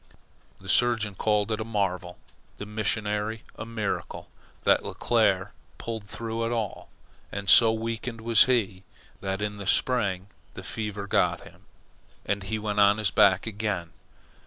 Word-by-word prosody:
The 95 - -14
surgeon 115 0 +2
called 105 +2 +1
it 110 - -1
a - - -1
marvel, 95 -5 -2 0.4
the 105 - -6
missionary 105 +1 -2
a 110 - -7
miracle, 110 -3 -4 0.3
that - - +4
Leclere - - +1 0.3
pulled 115 -3 -5
through 115 +2 -4
at 115 - -1
all; 110 -5 -3 0.4
and 100 -1 -5
so 115 +4 +8
weakened 115 +1 -4
was 115 +2 +5
he, 110 -8 0 0.4
that 95 +1 -3
in 105 0 -3
the 100 -2 -7
spring 100 -8 +1 0.3
the - - -8
fever 105 -2 -4
got - - +1
him, - - -16 0.6
and 100 0 -1
he 110 +3 -3
went 105 -1 -2
on 100 +1 +6
his 110 -2 +1
back 95 -1 +4
again. 105 -6 -3
105 Hz, 150 wpm, -27 LUFS, 100-115 Hz, 0.6 s, so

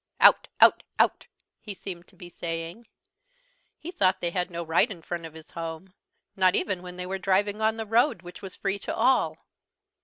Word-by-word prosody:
"Out - - +7
out - - +7 0.2
out!" - - +2 0.3
he 205 -2 -7
seemed 180 -2 -8
to - - -21
be 175 - -10
saying. 170 +6 -6 0.9
He 340 - -7
thought 190 - +2
they 170 - -1
had 180 0 -1
no 170 -1 -4
right 165 +8 +3
in 175 -6 -9
front 170 -1 -5
of 160 - -16
his 160 -1 -13
home, 165 +3 -7 0.4
not 185 -1 +4
even 195 -4 -1
when 180 0 -9
they 180 - -4
were 190 +1 -3
driving 200 +3 +1
on 220 +1 +2
the 225 - -3
road, 225 - +2
which 175 0 -11
was 190 -2 -8
free 195 0 -2
to - - -4
all. 260 0 +2
185 Hz, 195 wpm, -27 LUFS, 170-205 Hz, 0.9 s, Out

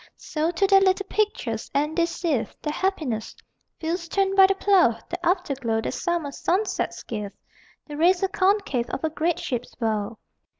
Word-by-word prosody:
So 310 +1 -2
to 355 +3 +1
their 390 0 +6
little 385 +1 +2
pictures, 265 - -1
and 300 +2 +1
they 340 -1 +2
sieve 325 -8 -2
Their 300 - -2
happinesses: 305 - -2 0.4
fields 340 +2 -3
turned 390 +2 +1
by 385 -1 +8
the 390 - +1
plough, 375 - +4
The 355 0 -5
afterglow 275 - 0
that - - -3
summer 345 -5 -2
sunsets 380 +9 -1
give, 210 -3 -5 0.5
The 295 -1 -8
razor 355 +4 +3
concave 380 - +1
of 270 - -4
a 315 - 0
great 325 +2 0
ship's 245 -1 -4
bow. 220 -2 -2
335 Hz, 165 wpm, -24 LUFS, 255-380 Hz, 0.5 s, by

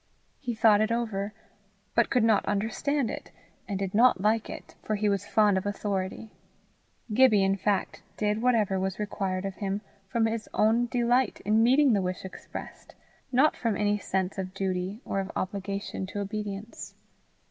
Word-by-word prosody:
He 245 -4 -3
thought 215 -1 +5
it 220 +1 +1
over, 215 -4 -1 0.6
but - - +3
could 250 -3 +2
not 220 -2 +4
understand 230 +6 0
it, - - -7 0.4
and 200 - -2
did 195 -1 -3
not 240 0 +5
like 215 +3 +1
it, - - -9
for 215 - -1
he 210 +1 0
was 200 -2 0
fond 210 -3 +4
of 185 - -9
authority. 205 +1 -3 0.8
Gibbie 220 -4 +5
in 195 0 +2
fact 200 0 -1 0.2
did 210 +1 0
whatever 220 -6 +2
was 190 0 -2
required 195 -2 -2
of 195 - -3
him 200 0 -2 0.3
from 230 +1 +1
his 225 -1 -2
own 225 +3 +3
delight 245 +1 +1
in 215 +2 +4
meeting 260 +3 +5
the 200 - +2
wish 185 0 -3
expressed, 190 - -9 0.4
not 270 +4 +4
from 230 -4 -1
any 210 0 +1
sense 190 0 -2
of 185 0 -5
duty 190 +2 -2
or 195 - -1
of 195 0 -3
obligation 195 0 -3
to 205 - -5
obedience. 205 +1 -5
210 Hz, 170 wpm, -28 LUFS, 195-225 Hz, 0.8 s, thought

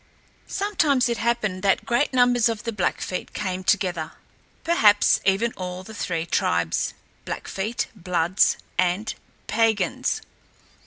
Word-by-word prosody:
Sometimes 310 -11 +1
it 235 - -1
happened 220 -5 0
that 195 0 +2
great 240 +6 +1
numbers 245 -2 +4
of 225 -2 -4
the 230 - -2
Blackfeet 185 -2 -2
came 185 -1 -3
together, 180 -5 0 0.5
perhaps 215 -12 +4
even 205 +4 +2
all 180 0 -5
of - - -15
the 220 - -10
three 170 -5 -2
tribes, 85 - 0 0.3
Blackfeet, 210 +5 -3
Bloods, 180 -1 +2 0.2
and 185 +4 +1 0.3
Piegans. 225 0 0
205 Hz, 120 wpm, -24 LUFS, 185-235 Hz, 0.5 s, numbers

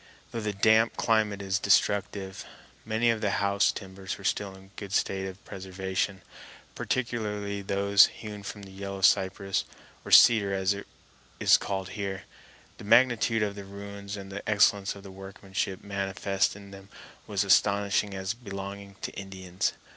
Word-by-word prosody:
Though 115 - -3
the 105 -1 -1
damp 110 +3 +3
climate 105 -3 +1
is 95 0 0
destructive, 100 -1 +1 0.4
many 115 +2 +2
of 110 -1 -3
the 105 - +1
house 100 0 +2
timbers 95 -1 -7
were - - -13
still 100 -2 -1
in 95 - -14
a 95 - -19
good 100 -2 -7
state 95 -1 0
of 95 +1 -10
preservation, 95 0 -3 0.5
particularly 105 -5 -2
those 100 +1 +5
hewn 105 -2 -9
from 100 0 -8
the 95 - -11
yellow 100 0 -6
cypress, 95 +1 +2 0.4
or - - -9
cedar 100 -4 +7
as 95 +1 +1
it 100 - -8 0.5
is - - +6
called 95 -2 -2
here. 100 -2 -4 0.6
The - - -9
magnitude 115 0 +4
of 105 -1 -1
the 100 0 -8
ruins 100 0 -8
and 95 0 -9
the 100 +1 -5
excellence 100 -2 +3
of 100 - -12
the 100 - -10
workmanship 95 0 -5
manifest 100 -1 -1
in 100 -1 -12
them 95 0 -12 0.4
was - - 0
astonishing 100 0 +2
as 95 +2 -2
belonging 100 -3 -8
to - - -3
Indians. 95 -2 -3
100 Hz, 160 wpm, -28 LUFS, 95-105 Hz, 0.6 s, cedar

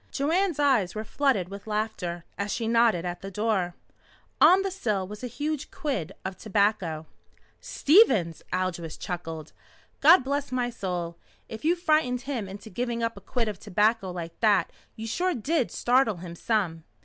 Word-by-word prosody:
Joanne's 335 +5 +1
eyes 260 -11 +2
were 215 - -3
flooded 220 -7 +1
with 200 +2 -9
laughter 210 -6 -3
as 200 0 -3
she 230 -1 -2
nodded 230 -6 +3
at 175 0 -4
the 195 - -6
door. 195 -3 -1 0.7
On 380 +2 +7
the 390 - -2
sill 210 - -1
was 210 +4 -9
a - - -2
huge 295 +3 -3
quid 270 - -3
of 190 0 -3
tobacco. 200 -7 0 0.5
"Stevens!" 250 - +4
Aldous 180 -3 -2
chuckled. 165 -3 -6 0.5
"God 320 +2 +7
bless 280 +1 -2
my 245 -1 0
soul, 175 -6 -4 0.3
if 220 - -8
you 335 +3 +3
frightened 310 -7 +1
him 255 -6 -3
into 205 +3 -9
giving 235 +3 -2
up 230 0 -1
a - - -11
quid 240 -3 -2
of 210 -3 -4
tobacco 210 0 +1
like 170 -2 -7
that 205 -6 +3 0.2
you 220 - -6
sure 355 +11 0
did 270 +3 0
startle 245 -5 +2
him 170 0 -8
some!" 175 -5 -1
220 Hz, 165 wpm, -27 LUFS, 185-265 Hz, 0.7 s, On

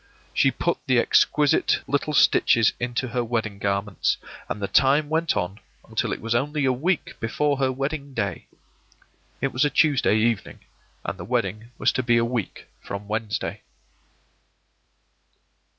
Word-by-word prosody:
She - - +4
put - - -1
the - - +3
exquisite 150 -2 +3
little 145 +2 -1
stitches 115 -4 +4
into 120 +1 -2
her 120 +1 -1
wedding 110 -4 -2
garments, 100 0 0 0.3
and - - -3
the 100 - -2
time 140 +6 +3
went 160 +1 +1
on 95 +4 -3 0.3
until - - -1
it - - -3
was 115 +1 -1
only 145 +4 0
a 130 - +3
week 165 +7 -1
before 145 +5 0
her 130 -1 +2
wedding 140 +1 -4
day. 100 -5 -3 0.9
It 135 - -1
was 125 - +2
a 145 - +3
Tuesday 140 -8 +3
evening, 110 -2 -1 0.4
and - - -4
the - - -5
wedding 105 +4 -2
was - - +2
to 130 - -1
be 120 -1 +3
a 115 - +3
week 115 -4 -4
from 100 +1 -7
Wednesday. 110 0 -3
120 Hz, 150 wpm, -24 LUFS, 110-140 Hz, 0.9 s, She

